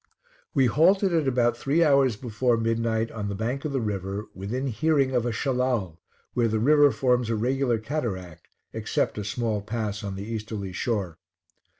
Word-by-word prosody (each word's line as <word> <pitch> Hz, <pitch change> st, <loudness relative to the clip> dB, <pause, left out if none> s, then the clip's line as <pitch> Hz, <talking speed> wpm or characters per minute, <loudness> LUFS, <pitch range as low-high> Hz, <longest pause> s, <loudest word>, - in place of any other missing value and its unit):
We 135 Hz, -, +4 dB
halted 180 Hz, -, +3 dB
at 160 Hz, -4 st, +2 dB
about 120 Hz, -2 st, +2 dB
three 155 Hz, +5 st, +2 dB
hours 140 Hz, -6 st, +4 dB
before 120 Hz, +1 st, 0 dB
midnight 115 Hz, 0 st, 0 dB
on 105 Hz, -2 st, -4 dB
the 100 Hz, -, -3 dB
bank 120 Hz, +7 st, -3 dB
of 150 Hz, -, -1 dB
the 135 Hz, -, 0 dB
river, 100 Hz, -2 st, -3 dB
within 110 Hz, +8 st, -4 dB
hearing 140 Hz, +1 st, +1 dB
of 125 Hz, -2 st, +1 dB
a -, -, 0 dB
Shellal, 120 Hz, -, -1 dB, 0.3 s
where 120 Hz, -1 st, +2 dB
the 110 Hz, 0 st, 0 dB
river 145 Hz, +5 st, +5 dB
forms 125 Hz, -3 st, +1 dB
a 115 Hz, -, +1 dB
regular 125 Hz, +2 st, +1 dB
cataract, 100 Hz, -, -4 dB, 0.3 s
except -, -, -1 dB
a -, -, -3 dB
small 105 Hz, 0 st, -2 dB
pass 105 Hz, -1 st, -3 dB
on 100 Hz, -1 st, -4 dB
the 95 Hz, -, -5 dB
easterly 110 Hz, -3 st, -5 dB
shore. 95 Hz, -6 st, -2 dB
115 Hz, 175 wpm, -26 LUFS, 105-135 Hz, 0.3 s, river